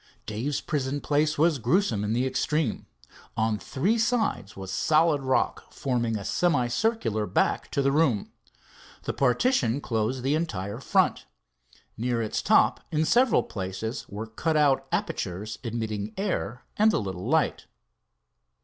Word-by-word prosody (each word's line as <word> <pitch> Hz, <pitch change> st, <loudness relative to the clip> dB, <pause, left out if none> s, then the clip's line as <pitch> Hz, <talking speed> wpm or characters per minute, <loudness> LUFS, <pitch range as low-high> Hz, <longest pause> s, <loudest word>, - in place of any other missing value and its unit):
Dave's 120 Hz, +7 st, -2 dB
prison 140 Hz, -1 st, -2 dB
place 150 Hz, +2 st, +1 dB
was 155 Hz, -1 st, +3 dB
gruesome 120 Hz, -, +1 dB
in 105 Hz, -, -1 dB
the 120 Hz, +3 st, +1 dB
extreme. 130 Hz, 0 st, -1 dB, 0.5 s
On 110 Hz, -1 st, +1 dB
three 200 Hz, -, 0 dB
sides 220 Hz, -, 0 dB
was 95 Hz, -1 st, -6 dB
solid 155 Hz, -, +3 dB
rock, 130 Hz, -1 st, 0 dB
forming 120 Hz, -4 st, -1 dB
a 100 Hz, -, -7 dB
semicircular 125 Hz, -, +1 dB
back -, -, 0 dB
to 140 Hz, -, 0 dB
the 135 Hz, -, +3 dB
room. 135 Hz, -8 st, +1 dB, 0.7 s
The -, -, -2 dB
partition, 135 Hz, -, +2 dB
closed 120 Hz, 0 st, -2 dB
the 135 Hz, +2 st, +1 dB
entire 100 Hz, -, -2 dB
front. -, -, +1 dB, 0.7 s
Near 120 Hz, +1 st, -1 dB
its 110 Hz, -2 st, -1 dB
top -, -, +4 dB
in 155 Hz, 0 st, +1 dB
several 245 Hz, +6 st, +4 dB
places 95 Hz, +5 st, -5 dB
were 105 Hz, +3 st, -5 dB
cut 155 Hz, +8 st, -1 dB
out 145 Hz, -3 st, +3 dB
apertures, 100 Hz, +4 st, -3 dB
admitting 110 Hz, -3 st, -3 dB
air 145 Hz, -, -2 dB
and 215 Hz, +1 st, +5 dB
a -, -, +2 dB
little 95 Hz, +1 st, -4 dB
light. 160 Hz, +1 st, +1 dB
130 Hz, 140 wpm, -26 LUFS, 110-155 Hz, 0.7 s, and